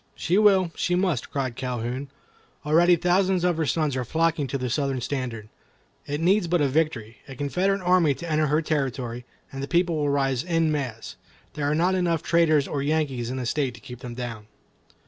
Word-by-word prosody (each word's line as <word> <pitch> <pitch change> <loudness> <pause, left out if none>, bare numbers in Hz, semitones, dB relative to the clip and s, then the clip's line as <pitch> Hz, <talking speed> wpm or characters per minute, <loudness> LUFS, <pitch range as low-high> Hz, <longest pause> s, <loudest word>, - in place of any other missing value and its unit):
"She 180 +5 +1
will, 190 -5 +4
she 180 - 0
must," 180 -8 0
cried 130 -4 -3
Calhoun. 125 +2 -4 0.6
"Already 170 +4 +5
thousands 180 +1 +2
of 175 -2 +2
her 160 -2 0
sons 150 +1 0
are 130 - -1
flocking 160 +2 0
to 140 - -2
the 130 -1 -3
Southern 135 +1 -1
standard. 120 -4 -4 0.6
It 145 +1 -2
needs 185 +3 +2
but 175 +1 +2
a 145 - +3
victory—a 130 -4 -2
Confederate 185 +9 0
army 180 -5 +3
to 170 - -8
enter 155 -1 +1
her 150 +3 +1
territory, 130 -5 -2 0.3
and 135 - -6
the 140 - -4
people 175 -1 +1
will 145 -1 0
rise 135 -2 +1
en 165 -3 +1
masse. 130 -7 -4 0.4
There 145 -1 -1
are 150 - +1
not 175 +4 +2
enough 175 -4 0
traitors 160 -4 +3
or 140 - -2
Yankees 140 -5 -1
in 130 - -4
the 130 - -3
state 130 0 -1
to - - -13
keep 125 +1 -10
them 125 -2 -8
down." 115 -4 -6
145 Hz, 195 wpm, -25 LUFS, 130-170 Hz, 0.6 s, Already